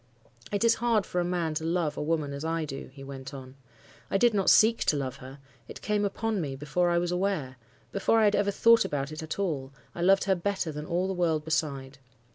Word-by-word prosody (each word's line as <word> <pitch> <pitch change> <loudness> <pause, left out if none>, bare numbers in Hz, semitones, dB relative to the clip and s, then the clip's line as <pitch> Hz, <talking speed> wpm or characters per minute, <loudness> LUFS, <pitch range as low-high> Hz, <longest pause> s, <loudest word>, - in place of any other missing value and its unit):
"'It 205 +2 0
is 230 0 +5
hard 230 -4 +2
for 180 - -1
a - - 0
man 175 -3 -1
to 155 - -3
love 165 -2 0
a - - -4
woman 150 -2 -1
as 140 +1 -6
I 165 0 -1
do,' 135 -1 -7
he 135 0 -12
went 135 0 -8
on—'I 130 +5 -8
did 240 +2 +4
not 195 -2 +2
seek 225 +1 +5
to 150 - +2
love 130 -2 -4
her, 130 +2 -11 0.3
it - - -10
came 210 -1 +1
upon 215 0 -1
me 140 -4 -4
before 150 +6 0
I 170 - +2
was 175 0 0
aware—before 180 - -1
I - - +4
had 205 0 +3
ever 205 0 +1
thought 230 +3 +5
about 140 0 -3
it 155 - -6
at 160 0 -5
all, 150 -9 -2 0.2
I 170 - -6
loved 195 +2 +4
her 195 - +2
better 190 -2 -2
than 150 0 -7
all 175 +2 0
the 190 - -2
world 165 -4 0
beside. 140 -4 -2
165 Hz, 230 wpm, -28 LUFS, 140-195 Hz, 0.3 s, is